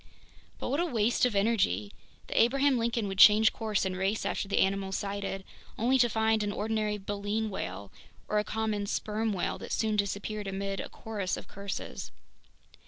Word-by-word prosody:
But -, -, -4 dB
what 280 Hz, +4 st, 0 dB
a 345 Hz, -, +2 dB
waste 240 Hz, -2 st, +2 dB
of 230 Hz, -, -4 dB
energy! 195 Hz, -, +1 dB, 0.3 s
The -, -, +2 dB
Abraham 270 Hz, +2 st, +3 dB
Lincoln 230 Hz, -2 st, 0 dB
would 195 Hz, -1 st, -4 dB
change 215 Hz, +2 st, +8 dB
course 215 Hz, -4 st, -1 dB
and 185 Hz, -1 st, -2 dB
race 195 Hz, +3 st, -1 dB
after -, -, -1 dB
the 195 Hz, -, -1 dB
animal 195 Hz, 0 st, +1 dB
sighted, 195 Hz, 0 st, -3 dB, 0.3 s
only 255 Hz, +4 st, +3 dB
to 240 Hz, -1 st, +5 dB
find 220 Hz, 0 st, +2 dB
an 205 Hz, 0 st, -1 dB
ordinary 215 Hz, 0 st, -1 dB
baleen 205 Hz, +2 st, -2 dB
whale 95 Hz, -, -5 dB, 0.4 s
or 210 Hz, -, +2 dB
a -, -, +1 dB
common 215 Hz, -2 st, -2 dB
sperm 215 Hz, +1 st, -1 dB
whale 185 Hz, -3 st, -2 dB
that -, -, -8 dB
soon 215 Hz, -1 st, +1 dB
disappeared 205 Hz, +1 st, -2 dB
amid 195 Hz, 0 st, -3 dB
a -, -, -5 dB
chorus 205 Hz, -5 st, -3 dB
of -, -, -9 dB
curses! 200 Hz, 0 st, -6 dB
210 Hz, 175 wpm, -30 LUFS, 195-220 Hz, 0.4 s, change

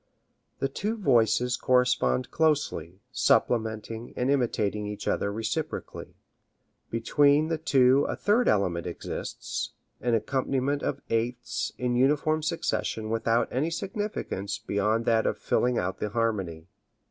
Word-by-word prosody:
The 135 Hz, -, 0 dB
two 210 Hz, +11 st, -3 dB
voices 125 Hz, -, +3 dB
correspond 125 Hz, -, +2 dB
closely, 135 Hz, -, 0 dB
supplementing 110 Hz, -2 st, 0 dB
and 125 Hz, +2 st, +1 dB
imitating 105 Hz, -6 st, 0 dB
each 105 Hz, 0 st, -6 dB
other 100 Hz, -, 0 dB
reciprocally. 110 Hz, +2 st, -4 dB, 0.7 s
Between 145 Hz, +6 st, +3 dB
the 165 Hz, -1 st, -1 dB
two 135 Hz, -3 st, +4 dB
a -, -, -1 dB
third 225 Hz, +4 st, +2 dB
element 90 Hz, -4 st, +1 dB
exists: 85 Hz, -, -5 dB, 0.3 s
an 120 Hz, -1 st, +1 dB
accompaniment 135 Hz, +4 st, 0 dB
of 140 Hz, -, -2 dB
eighths 115 Hz, 0 st, -1 dB
in 125 Hz, -1 st, 0 dB
uniform 150 Hz, +4 st, +2 dB
succession 150 Hz, -8 st, -2 dB
without 115 Hz, +1 st, +1 dB
any 140 Hz, +6 st, 0 dB
significance 170 Hz, -, -3 dB
beyond 105 Hz, +3 st, 0 dB
that 115 Hz, -1 st, +3 dB
of -, -, -1 dB
filling 125 Hz, -1 st, +1 dB
out 90 Hz, +1 st, -2 dB
the 105 Hz, -, -2 dB
harmony. 100 Hz, -8 st, -2 dB
120 Hz, 125 wpm, -27 LUFS, 105-140 Hz, 0.7 s, two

